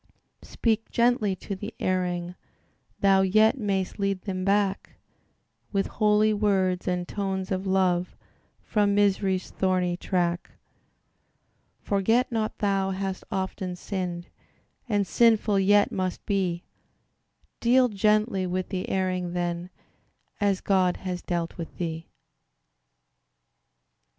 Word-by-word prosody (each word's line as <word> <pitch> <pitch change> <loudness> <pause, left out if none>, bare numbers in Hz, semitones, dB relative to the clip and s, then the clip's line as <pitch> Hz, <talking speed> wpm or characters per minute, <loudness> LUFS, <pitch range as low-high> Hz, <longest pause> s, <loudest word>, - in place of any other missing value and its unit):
Speak 225 -1 -1
gently 235 -5 +2
to 195 +2 -6
the 205 +3 -7
erring: 180 -1 -1 0.7
Thou 195 -1 +5
yet 215 +5 +4
may'st 195 -3 -2
lead 195 -1 0
them 185 -2 -3
back 200 0 0 0.8
With 195 -1 +1
holy 215 0 +2
words 190 -3 +1
and 180 -1 -1
tones 190 -2 -3
of 190 +1 -2
love, 185 -2 +1 0.5
From 205 -2 +1
misery's 195 -2 +1
thorny 185 -2 0
track: 175 -1 -1 1.3
Forget 225 +6 +1
not 220 -2 -2
thou 195 -2 +1
hast 190 0 -3
often 190 -1 -3
sinned, 180 -2 -4 0.6
And 205 -2 +2
sinful 215 -1 +3
yet 205 +1 +4
must 185 -1 -3
be; 185 -4 -1 1.0
Deal 250 +2 +4
gently 210 -2 +1
with 185 +1 -2
the 185 -1 -3
erring, 185 -2 -1
then, 175 0 -2 0.7
As 200 -2 +1
God 185 -2 +2
has 180 -1 -3
dealt 170 -2 -3
with 165 - -7
thee. 165 -2 -4
190 Hz, 110 wpm, -26 LUFS, 180-205 Hz, 1.3 s, Thou